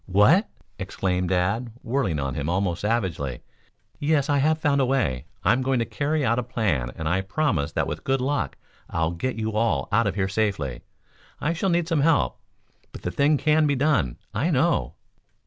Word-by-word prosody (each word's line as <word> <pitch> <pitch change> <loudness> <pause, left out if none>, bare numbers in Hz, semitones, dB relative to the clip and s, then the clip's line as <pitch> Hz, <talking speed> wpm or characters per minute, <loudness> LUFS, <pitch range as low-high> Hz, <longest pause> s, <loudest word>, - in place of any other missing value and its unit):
"What?" 105 - +4 0.3
exclaimed 90 -2 -1
Dad, 100 +6 0
whirling 115 - 0
on 70 -1 -2
him 75 0 -3
almost 90 -1 0
savagely. 95 - -1 0.6
"Yes, 145 -1 +1
I 140 - +3
have 155 +3 +3
found 145 -3 +2
a - - +3
way. 75 - 0 0.2
I'm 125 - +3
going 130 0 +1
to 115 - +1
carry 150 +2 -1
out 115 0 +2
a - - +1
plan 95 - -1
and 80 - -4
I 90 +4 +1
promise 95 - -1
that - - 0
with - - -5
good 135 0 +1
luck 140 +3 -1 0.3
I'll 80 0 0
get 100 +9 -3
you 110 0 -2
all 105 -11 0
out - - +3
of - - -1
here 100 -2 0
safely. 95 - -1 0.6
I 165 - 0
shall 185 +3 -1
need 170 -1 +1
some 165 -4 +1
help, 160 0 +2 0.5
but - - -11
the 90 - -2
thing 145 +5 +3
can 155 +1 +3
be 145 - +2
done, 130 - +1 0.2
I 140 - 0
know." 165 +2 +1
115 Hz, 190 wpm, -25 LUFS, 90-145 Hz, 0.6 s, What